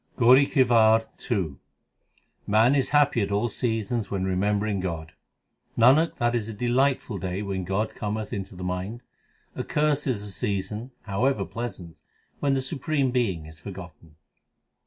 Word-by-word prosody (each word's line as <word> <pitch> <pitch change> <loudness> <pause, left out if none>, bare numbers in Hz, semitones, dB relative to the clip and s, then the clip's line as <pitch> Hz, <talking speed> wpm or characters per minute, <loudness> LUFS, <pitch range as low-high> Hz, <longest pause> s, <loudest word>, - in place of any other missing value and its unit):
GAURI 130 +3 +6
KI 135 - +4
WAR 115 -2 +4 0.2
II 90 - -1 0.9
Man 110 +5 +4
is 135 -2 +1
happy 145 -5 +3
at 100 - -2
all 105 +4 +1
seasons 115 0 -2
when 95 -2 -2
remembering 100 +2 0
God: 80 -3 -4 0.7
Nanak, 135 +8 +5
that 120 0 +1
is 115 -2 -1
a - - -5
delightful 125 -2 +1
day 95 +3 -3
when 95 -2 -3
God 95 +4 -1
cometh 105 +1 -4
into 95 -3 -5
the 90 - -7
mind. 90 +6 -4 0.5
Accursed 150 -1 0
is 105 -6 -1
the 105 - -6
season, 100 +6 -3
however 120 +7 0
pleasant, 105 -8 -7 0.4
when 140 -1 +1
the 135 - 0
Supreme 140 -1 -1
Being 100 -11 0
is 80 0 -12
forgotten. 85 -5 -10
110 Hz, 150 wpm, -26 LUFS, 95-125 Hz, 0.9 s, GAURI